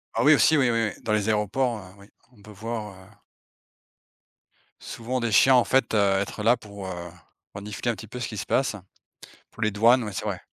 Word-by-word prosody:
Ah -, -, +1 dB
oui, 150 Hz, +1 st, +7 dB
aussi, 155 Hz, +1 st, +4 dB
oui, 130 Hz, -3 st, +3 dB
oui, 115 Hz, -3 st, 0 dB
dans 110 Hz, -, -2 dB
les 105 Hz, -1 st, 0 dB
aéroports, 110 Hz, +3 st, 0 dB
heu, -, -, -10 dB, 0.2 s
oui, 100 Hz, -, -16 dB, 0.3 s
on 110 Hz, -, -22 dB
peut 110 Hz, -, -13 dB
voir, 105 Hz, 0 st, -6 dB
heu 95 Hz, -, -19 dB, 1.7 s
souvent 125 Hz, +3 st, -4 dB
des 115 Hz, -2 st, -2 dB
chiens 130 Hz, +5 st, +6 dB
en 125 Hz, -, +5 dB
fait, 115 Hz, +3 st, +1 dB
heu, -, -, +3 dB, 0.2 s
être 100 Hz, +2 st, -4 dB
là 120 Hz, +3 st, +4 dB
pour, 100 Hz, -3 st, -10 dB
heu, 85 Hz, -2 st, -7 dB, 0.4 s
renifler 105 Hz, +4 st, -4 dB
un 115 Hz, -, -5 dB
petit 110 Hz, -, -11 dB
peu 125 Hz, +4 st, -8 dB
ce 120 Hz, -, -3 dB
qui 110 Hz, -, -7 dB
se 100 Hz, -, -4 dB
passe, 130 Hz, -5 st, 0 dB, 0.8 s
pour 115 Hz, -, -13 dB
les 110 Hz, -, +1 dB
douanes, 115 Hz, +5 st, +4 dB
ouais, 105 Hz, -2 st, -6 dB
c'est -, -, -5 dB
vrai. -, -, -3 dB
110 Hz, 215 wpm, -25 LUFS, 105-120 Hz, 1.7 s, oui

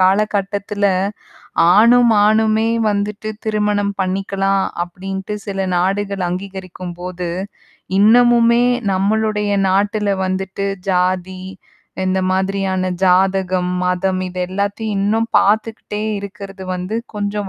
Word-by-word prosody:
காலகட்டத்தில 200 Hz, +1 st, +1 dB, 0.9 s
ஆணும், 235 Hz, +2 st, +6 dB
ஆணுமே 220 Hz, +1 st, +2 dB, 0.2 s
வந்துட்டு 205 Hz, +1 st, -2 dB, 0.2 s
திருமணம் 210 Hz, -1 st, 0 dB
பண்ணிக்கலாம் 195 Hz, +1 st, 0 dB, 0.2 s
அப்பிடின்ட்டு 190 Hz, +3 st, -6 dB
சில 195 Hz, -1 st, -3 dB, 0.2 s
நாடுகள் 195 Hz, +1 st, 0 dB
அங்கீகரிக்கும்போது 180 Hz, -1 st, -6 dB, 0.7 s
இன்னமுமே 235 Hz, +2 st, +5 dB, 0.3 s
நம்மளுடைய 210 Hz, +2 st, 0 dB, 0.2 s
நாட்டில 205 Hz, +2 st, +1 dB, 0.2 s
வந்துட்டு 190 Hz, +1 st, -3 dB, 0.3 s
ஜாதி 185 Hz, 0 st, 0 dB, 0.6 s
இந்த 185 Hz, 0 st, +1 dB
மாதிரியான 190 Hz, 0 st, 0 dB
ஜாதகம், 185 Hz, -1 st, +2 dB
மதம் 185 Hz, +1 st, 0 dB
இது 180 Hz, 0 st, -5 dB
எல்லாத்தையும் 200 Hz, +3 st, -2 dB
இன்னும் 220 Hz, +3 st, +1 dB
பாத்துக்கிட்டே 210 Hz, 0 st, +1 dB, 0.2 s
இருக்கிறது 200 Hz, -1 st, -8 dB
வந்து 180 Hz, +3 st, -4 dB, 0.2 s
கொஞ்சம் 205 Hz, -1 st, -3 dB
195 Hz, 90 wpm, -18 LUFS, 185-210 Hz, 0.9 s, ஆணும்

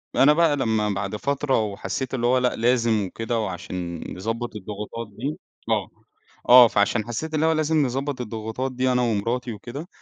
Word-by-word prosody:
أنا 145 Hz, +2 st, +6 dB
بقى 160 Hz, -2 st, +3 dB
لما 110 Hz, -4 st, +1 dB
بعد 100 Hz, +1 st, -2 dB
فترة 140 Hz, -1 st, 0 dB
وحسّيت 100 Hz, +5 st, -4 dB
اللي 120 Hz, -2 st, 0 dB
هو 130 Hz, +1 st, +4 dB
لأ، 125 Hz, 0 st, +1 dB
لازم 115 Hz, -3 st, +2 dB
وكده، 115 Hz, +4 st, -3 dB
وعشان 90 Hz, -3 st, -4 dB
يضبّط 115 Hz, +4 st, -4 dB
الضغوطات 105 Hz, +3 st, -6 dB
دي 140 Hz, +6 st, -3 dB, 0.3 s
آه، -, -, 0 dB, 0.6 s
آه، 125 Hz, -1 st, +10 dB
فعشان 105 Hz, 0 st, +1 dB
حسّيت 155 Hz, +7 st, -4 dB
إن 155 Hz, 0 st, +1 dB
هو 160 Hz, -, +4 dB
لازم 155 Hz, -2 st, +2 dB
نضبّط 135 Hz, +1 st, -3 dB
الضغوطات 110 Hz, +3 st, -4 dB
دي 130 Hz, 0 st, 0 dB
أنا 125 Hz, 0 st, +2 dB
ومراتي 120 Hz, +2 st, -1 dB
وكده، 130 Hz, -, -8 dB
120 Hz, 170 wpm, -24 LUFS, 105-130 Hz, 0.6 s, آه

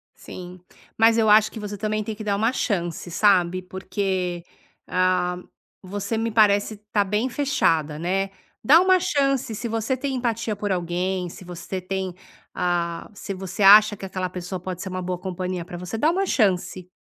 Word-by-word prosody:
Sim, 180 Hz, 0 st, -10 dB, 0.4 s
mas 225 Hz, +1 st, +5 dB
eu 220 Hz, -1 st, +3 dB
acho 215 Hz, 0 st, +6 dB
que 220 Hz, -, -8 dB
você 205 Hz, 0 st, -6 dB
também 215 Hz, +1 st, -1 dB
tem 215 Hz, +1 st, -5 dB
que 215 Hz, -, -8 dB
dar 200 Hz, -1 st, 0 dB
uma 225 Hz, +4 st, +1 dB
chance, 175 Hz, -8 st, -2 dB
sabe, 185 Hz, -1 st, +3 dB
porque, 185 Hz, -1 st, -3 dB, 0.4 s
hã, 180 Hz, -1 st, +1 dB, 0.4 s
você 200 Hz, +3 st, -4 dB
me 230 Hz, +1 st, 0 dB
parece 210 Hz, -1 st, +3 dB
tá 205 Hz, -, +3 dB
bem 210 Hz, +6 st, 0 dB
fechada, 165 Hz, -, +1 dB
né, 190 Hz, +4 st, -1 dB, 0.3 s
dá 305 Hz, +10 st, +7 dB
uma 370 Hz, 0 st, +4 dB
chance, 275 Hz, -7 st, 0 dB
se 235 Hz, +2 st, -4 dB
você 225 Hz, +3 st, -1 dB
tem 270 Hz, +1 st, -3 dB
empatia 230 Hz, -3 st, -1 dB
por 205 Hz, 0 st, -3 dB
alguém, 180 Hz, +1 st, -1 dB
se 180 Hz, -, -12 dB
você 175 Hz, +2 st, -6 dB
tem, 190 Hz, 0 st, -3 dB, 0.4 s
hã, 170 Hz, -1 st, -1 dB
se 200 Hz, -1 st, -6 dB
você 190 Hz, +1 st, -4 dB
acha 210 Hz, +2 st, +8 dB
que 195 Hz, -, -8 dB
aquela 185 Hz, -1 st, -3 dB
pessoa 180 Hz, 0 st, -5 dB
pode 180 Hz, 0 st, -6 dB
ser 190 Hz, -, -5 dB
uma 185 Hz, 0 st, -4 dB
boa 180 Hz, 0 st, -3 dB
companhia 185 Hz, -1 st, -4 dB
pra 175 Hz, +1 st, -8 dB
você, 180 Hz, +5 st, -5 dB
dá 305 Hz, +7 st, +3 dB
uma 390 Hz, +2 st, 0 dB
chance, 185 Hz, -, 0 dB
195 Hz, 180 wpm, -23 LUFS, 180-220 Hz, 0.4 s, acha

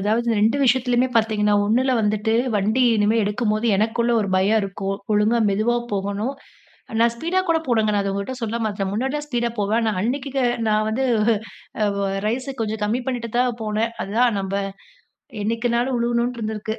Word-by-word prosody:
அதாவது 220 Hz, +4 st, 0 dB
2 220 Hz, +5 st, +3 dB
விஷயத்துலயுமே 250 Hz, 0 st, +2 dB
பார்த்தீங்கன்னா, 215 Hz, -2 st, +2 dB
ஒன்னுல 255 Hz, +5 st, +2 dB
வந்துட்டு 210 Hz, +1 st, 0 dB, 0.2 s
வண்டி 215 Hz, +5 st, +2 dB
இனிமே 210 Hz, +2 st, +2 dB
எடுக்கும்போது, 215 Hz, +1 st, 0 dB
எனக்குள்ள 225 Hz, +3 st, +1 dB
ஒரு 200 Hz, -, -2 dB
பயம் 205 Hz, +4 st, +3 dB
இருக்கும். 195 Hz, 0 st, -3 dB, 0.2 s
ஒழுங்கா 210 Hz, +3 st, +3 dB
மெதுவா 215 Hz, +4 st, +1 dB, 0.2 s
போகணும். 200 Hz, +5 st, -2 dB, 0.7 s
நான் 235 Hz, 0 st, +4 dB
ஸ்பீடா 340 Hz, +10 st, 0 dB
கூட 330 Hz, -1 st, +3 dB
போனேங்க 220 Hz, -4 st, +2 dB
நான் 205 Hz, -1 st, +1 dB
அத 195 Hz, -, -2 dB
உங்கள்கிட்ட 200 Hz, +6 st, -4 dB
சொல்ல 225 Hz, 0 st, -2 dB
மறந்துட்டேன். 200 Hz, -3 st, -2 dB
முன்னாடிலாம் 265 Hz, +7 st, -2 dB
ஸ்பீடா 240 Hz, -3 st, -1 dB
போவேன். 205 Hz, +2 st, +1 dB
ஆனா 220 Hz, -1 st, +1 dB
அன்னைக்கி 265 Hz, +5 st, -2 dB, 0.4 s
நான் 215 Hz, 0 st, +2 dB
வந்து 240 Hz, +5 st, -1 dB, 0.8 s
அ -, -, +2 dB
வ 200 Hz, -, 0 dB, 0.2 s
ரைஸை 255 Hz, +5 st, -2 dB
கொஞ்சம் 220 Hz, -1 st, -2 dB
கம்மி 225 Hz, +4 st, 0 dB
பண்ணிட்டு 240 Hz, -3 st, -3 dB
தான் 245 Hz, -1 st, +1 dB
போனேன் 220 Hz, +2 st, -1 dB
அதுதான், 230 Hz, +3 st, +1 dB
நம்ப 195 Hz, 0 st, -4 dB, 0.9 s
என்னைக்குனாலும் 235 Hz, +4 st, 0 dB
விழுகணுன்னு 240 Hz, +1 st, 0 dB
இருந்திருக்கு 220 Hz, 0 st, -3 dB
220 Hz, 160 wpm, -22 LUFS, 210-240 Hz, 0.9 s, நான்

